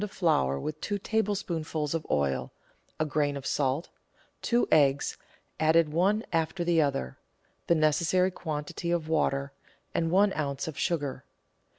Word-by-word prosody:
of 210 Hz, -, -3 dB
flour 150 Hz, -, +1 dB
with 155 Hz, -, -5 dB
two 205 Hz, -, -1 dB
tablespoonfuls 185 Hz, -8 st, -1 dB
of 165 Hz, -2 st, -3 dB
oil, 70 Hz, -2 st, 0 dB, 0.5 s
a 155 Hz, -, +2 dB
grain 145 Hz, -1 st, 0 dB
of 140 Hz, -, -8 dB
salt, 140 Hz, +3 st, 0 dB, 0.5 s
two 240 Hz, 0 st, +2 dB
eggs 140 Hz, -2 st, +3 dB, 0.4 s
(added 160 Hz, 0 st, +4 dB
one 200 Hz, +6 st, +2 dB
after 165 Hz, +2 st, 0 dB
the 170 Hz, -1 st, +3 dB
other), 100 Hz, -, -2 dB, 0.5 s
the 170 Hz, -, +4 dB
necessary 165 Hz, +4 st, +2 dB
quantity 155 Hz, +1 st, -4 dB
of 170 Hz, -2 st, 0 dB
water, 140 Hz, -3 st, 0 dB, 0.4 s
and 165 Hz, -1 st, 0 dB
one 195 Hz, +3 st, +4 dB
oz. 140 Hz, -2 st, -2 dB
of 160 Hz, -, -5 dB
sugar. 145 Hz, -5 st, -2 dB
155 Hz, 145 wpm, -28 LUFS, 145-175 Hz, 0.5 s, added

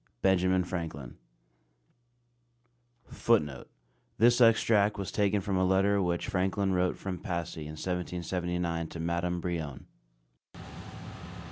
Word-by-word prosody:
BENJAMIN 95 Hz, -1 st, +3 dB
FRANKLIN. 80 Hz, -8 st, -6 dB, 1.9 s
[Footnote: 75 Hz, -, 0 dB, 0.5 s
This 120 Hz, +3 st, +4 dB
extract 110 Hz, -2 st, +4 dB
was 100 Hz, -2 st, -4 dB
taken 105 Hz, -1 st, +1 dB
from 95 Hz, 0 st, -1 dB
a 95 Hz, -, +2 dB
letter 95 Hz, +2 st, +3 dB
which 85 Hz, -2 st, -1 dB
Franklin 95 Hz, +1 st, 0 dB
wrote 90 Hz, 0 st, +1 dB
from 95 Hz, -2 st, -5 dB
Passy 85 Hz, -3 st, -4 dB
in 75 Hz, -, -7 dB
1779 90 Hz, -1 st, -2 dB
to 85 Hz, -, -9 dB
Madame 85 Hz, +1 st, -1 dB
Brillon. 80 Hz, -6 st, -4 dB
90 Hz, 105 wpm, -29 LUFS, 85-95 Hz, 1.9 s, This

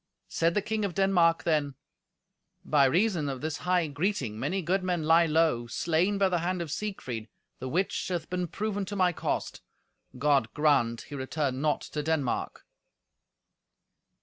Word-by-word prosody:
Said 165 Hz, +1 st, +1 dB
the 205 Hz, -, +1 dB
King 220 Hz, 0 st, -2 dB
of 195 Hz, -4 st, -2 dB
Denmark 180 Hz, -4 st, +3 dB
then, 150 Hz, -4 st, 0 dB, 0.9 s
"By 145 Hz, -2 st, +4 dB
reason 170 Hz, 0 st, +2 dB
of 135 Hz, -2 st, -5 dB
this 155 Hz, -1 st, -3 dB
high 180 Hz, -1 st, +1 dB
greeting 145 Hz, -, -2 dB
many 190 Hz, +7 st, -1 dB
good 185 Hz, +4 st, +1 dB
men 175 Hz, -3 st, -1 dB
lie 165 Hz, +2 st, +5 dB
low, 155 Hz, -7 st, +2 dB
slain 170 Hz, +10 st, +1 dB
by 195 Hz, -1 st, +3 dB
the 180 Hz, -2 st, 0 dB
hand 180 Hz, +2 st, -1 dB
of 165 Hz, -4 st, -4 dB
Siegfried, 130 Hz, -, -4 dB, 0.3 s
the 130 Hz, -, -5 dB
which 185 Hz, +8 st, -1 dB
hath 175 Hz, -3 st, -3 dB
been 180 Hz, -1 st, -2 dB
proven 205 Hz, +3 st, -3 dB
to 205 Hz, -, -6 dB
my 180 Hz, -2 st, +3 dB
cost. -, -, -3 dB, 0.6 s
God 140 Hz, +1 st, +2 dB
grant 140 Hz, -6 st, +2 dB
he -, -, -12 dB
return 135 Hz, -1 st, -2 dB
not 150 Hz, -1 st, +1 dB
to 150 Hz, -, -4 dB
Denmark!" 150 Hz, -4 st, -2 dB
165 Hz, 160 wpm, -28 LUFS, 145-185 Hz, 0.9 s, lie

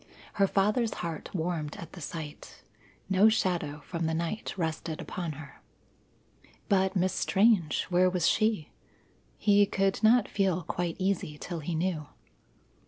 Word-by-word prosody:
Her 195 Hz, -, +6 dB
father's 210 Hz, +4 st, +1 dB
heart 165 Hz, -2 st, -5 dB
warmed 160 Hz, -4 st, -2 dB
at 170 Hz, -, -9 dB
the 180 Hz, -, -9 dB
sight. 155 Hz, 0 st, -8 dB, 0.4 s
No 195 Hz, +3 st, +5 dB
shadow 170 Hz, -8 st, -1 dB
from 170 Hz, -2 st, -2 dB
the 160 Hz, -, 0 dB
night 170 Hz, +6 st, -3 dB
rested 160 Hz, -2 st, -3 dB
upon 170 Hz, -4 st, -4 dB
her. 145 Hz, -1 st, -12 dB, 1.1 s
But 190 Hz, 0 st, +2 dB
Miss 185 Hz, 0 st, +1 dB
Strange! 195 Hz, -6 st, +3 dB
where 180 Hz, +1 st, +4 dB
was 180 Hz, -2 st, +1 dB
she? 215 Hz, -8 st, +1 dB, 0.7 s
He 205 Hz, -1 st, +4 dB
could 195 Hz, 0 st, 0 dB
not 230 Hz, 0 st, +5 dB
feel 190 Hz, -3 st, 0 dB
quite 175 Hz, 0 st, -2 dB
easy 185 Hz, -6 st, -1 dB
till 170 Hz, +2 st, -5 dB
he 160 Hz, +2 st, -3 dB
knew. 160 Hz, -3 st, -1 dB
180 Hz, 140 wpm, -29 LUFS, 160-195 Hz, 1.1 s, Her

